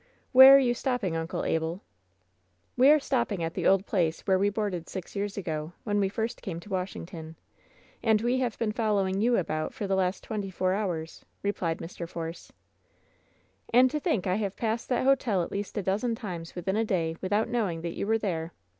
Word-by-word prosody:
"Where 265 +1 +10
are - - +9
you 250 -3 +3
stopping, 240 -9 -1
Uncle 165 0 -3
Abel 160 +3 -1 0.5
?" 90 - -23
'^e 260 +3 +7
are 305 - +6
stopping 235 - -1
at 165 0 -2
the - - 0
old 195 0 +4
place 170 -6 0
where 190 -1 +2
we 200 +1 +3
boarded 200 -5 -3
six 185 0 -7
years 205 0 -3
ago, 160 -3 -4
when 205 -2 0
we 195 -1 +2
first 225 +4 -3
came 175 -6 -5
to 205 - -13
Washington. 170 -3 -5 0.7
And 220 -2 +3
we 240 +3 +1
have 245 -4 -1
been 225 -2 0
following 205 -3 0
you 240 +2 +3
about 155 -3 -2
for 205 - -3
the 195 - -1
last 185 0 0
twenty 205 -3 -4
four 185 0 0
hours," 175 -6 -3 0.2
replied 175 -5 -1
Mr. 170 0 -7
Force. 165 0 -6 1.2
"And 250 +2 +6
to 300 - -1
think 295 - 0
I 185 0 +1
have 200 -3 -3
passed 230 0 -2
that 250 - +1
hotel 250 -9 +2
at - - -7
least 200 +2 -4
a 205 - -1
dozen 215 +6 0
times 175 -7 -7
within 185 +2 -2
a 225 - +2
day 170 -6 -1
without 205 +4 +1
knowing 210 -9 -1
that 170 0 -4
you - - -3
were 225 +1 +3
there 170 -6 -3
195 Hz, 205 wpm, -28 LUFS, 170-225 Hz, 1.2 s, Where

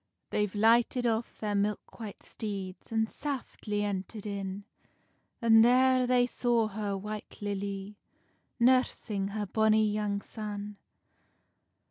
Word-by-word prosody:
They've 210 -1 0
lighted 235 +3 +4
off 230 0 -1
their 210 -1 -2
milk 205 +3 -2
white 215 -3 -8
steeds, 195 -3 -6
An 220 0 +2
saftly 230 -5 -4
enterd 205 +1 -4
in, 200 -1 -4 0.8
And 225 -1 +7
there 255 +1 +5
they 250 -1 +4
saw 240 -2 +1
her 205 -1 -3
White 210 +2 -7
Lilly, 200 0 -4 0.6
Nursing 235 -5 +2
her 205 +1 -3
bonny 220 +2 +3
young 205 -1 -1
son. 210 -1 -6
210 Hz, 115 wpm, -30 LUFS, 200-230 Hz, 0.8 s, And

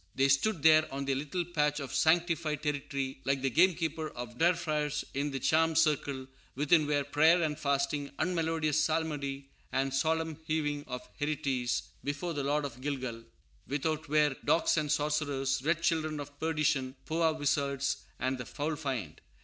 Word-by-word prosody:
They 135 +1 +3
stood 145 +4 +2
there 155 -1 +6
on 140 +1 -3
their 135 - +1
little 150 +6 -2
patch 150 -3 0
of 135 -3 -6
sanctified 160 -2 +2
territory 140 -2 -3
like 135 0 0
the 135 - +1
gamekeeper 160 -1 +2
of 120 -2 -8
Der 170 +2 +5
Freischutz 150 -3 -1
in 140 +2 -1
the 135 -1 -3
charmed 160 +3 +2
circle; 145 -4 +1 0.3
within 150 +2 +3
were 145 -1 +1
prayer 155 +5 +4
and 150 -1 0
fasting, 140 0 0
unmelodious 160 -3 +1
psalmody 145 -4 -2 0.2
and 135 0 0
solemn 160 +2 0
hewing 145 -2 -1
of 125 -1 -6
hereties, 140 -5 -1 0.2
"before 145 +5 -3
the 145 -2 -2
Lord 145 +1 +1
in 130 -2 -7
Gilgal;" 130 -5 -4 0.4
without 150 +2 -2
were 150 -2 +3
"dogs 165 - +3
and 150 -2 0
sorcerers, 145 -3 0
red 170 +2 +1
children 155 -2 0
of 145 0 -9
perdition, 150 -5 0
Powah 160 0 +1
wizards," 140 -2 0 0.2
and 130 0 -1
"the 125 - -5
foul 155 +2 -2
fiend." 130 - -4
150 Hz, 160 wpm, -31 LUFS, 140-160 Hz, 0.4 s, there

